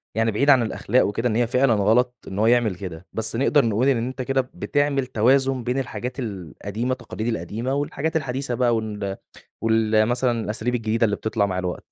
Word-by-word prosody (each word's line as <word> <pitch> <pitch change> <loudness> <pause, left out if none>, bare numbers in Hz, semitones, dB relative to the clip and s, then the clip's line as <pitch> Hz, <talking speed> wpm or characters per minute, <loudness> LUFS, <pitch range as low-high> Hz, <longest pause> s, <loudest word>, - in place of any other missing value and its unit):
يعني 115 0 +2
بعيد 140 +8 +1
عن 135 -3 +7
الأخلاق 115 +2 +1
وكده 115 +4 -1
إن 110 - -1
هي 120 0 +2
فعلًا 125 0 +3
غلط 115 +5 +2
إن 95 +2 -5
هو 110 - +3
يعمل 120 -4 +3
كده، 90 -1 -8
بس 110 0 -2
نقدر 135 +2 +3
نقول 115 +4 +1
إن 135 - +3
أنت 130 0 -5
كده 135 +1 +1
بتعمل 145 -2 0
توازن 130 +2 +2
بين 125 +3 -1
الحاجات 125 0 -5
القديمة 100 - -4
التقاليد 115 -3 -4
القديمة، 115 +5 -2
والحاجات 145 +3 -2
الحديثة 135 -3 -2
بقى 120 -1 +2
وال 105 -3 -3 0.4
وال 110 -1 +3
مثلًا 120 -1 +1
الأساليب 110 +3 -2
الجديدة 115 -1 0
اللي 105 -2 +1
بتطلع 110 -1 0
مع 95 -2 -3
الوقت. 90 -1 -3
115 Hz, 190 wpm, -23 LUFS, 110-130 Hz, 0.4 s, عن